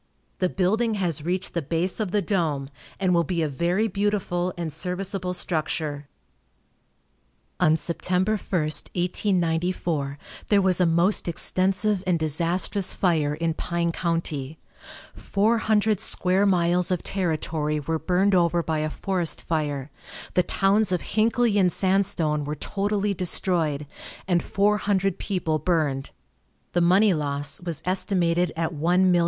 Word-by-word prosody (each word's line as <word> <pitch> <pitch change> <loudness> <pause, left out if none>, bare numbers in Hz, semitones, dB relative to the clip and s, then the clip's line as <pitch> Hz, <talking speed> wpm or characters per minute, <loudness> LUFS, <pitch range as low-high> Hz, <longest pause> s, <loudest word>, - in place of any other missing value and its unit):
The 185 - +1
building 215 +5 +1
has 170 -7 -1
reached 180 +3 -2
the 170 - -1
base 165 +6 -1
of 215 -3 -1
the 205 +1 0
dome, 155 -8 -1 0.3
and 185 -2 +2
will 170 -1 +3
be 170 0 -1
a - - +1
very 175 +9 0
beautiful 195 -3 -1
and 165 -3 -3
serviceable 180 +2 -3
structure. 155 -4 -2 1.5
On 155 - +4
Sept. 170 +2 -2
1, 180 0 +3
1894, 175 -4 -1 0.3
there 205 - +4
was 185 -2 +2
a 180 - +4
most 170 +5 +2
extensive 190 +3 0
and 180 -2 +3
disastrous 170 +5 0
fire 155 -5 +1
in 165 +1 -1
Pine 170 +1 -1
county. 160 -4 -3 0.6
Four 220 +3 +1
hundred 215 -2 +2
square 185 +2 +2
miles 180 -1 +2
of 180 -2 -1
territory 155 -4 -1
were 160 +2 -2
burned 185 +5 +1
over 170 -1 +3
by 160 -1 -1
a 155 0 -1
forest 180 0 -2
fire, 145 -4 -2 0.4
the 180 - +4
towns 195 +3 +2
of 180 - 0
Hinckley 225 0 +2
and 180 -2 +3
Sandstone 180 -6 +1
were 150 +1 -4
totally 205 +5 -1
destroyed, 170 -5 0 0.4
and 175 -2 +2
four 205 +1 +1
hundred 195 -1 0
people 165 -6 -1
burned. 150 -5 0 0.6
The 175 - +1
money 190 +4 +4
loss 145 -1 -2
was 165 -3 -4
estimated 180 -2 +1
at 165 0 -1
$1,000,000. 175 +3 +3
175 Hz, 135 wpm, -24 LUFS, 160-195 Hz, 1.5 s, On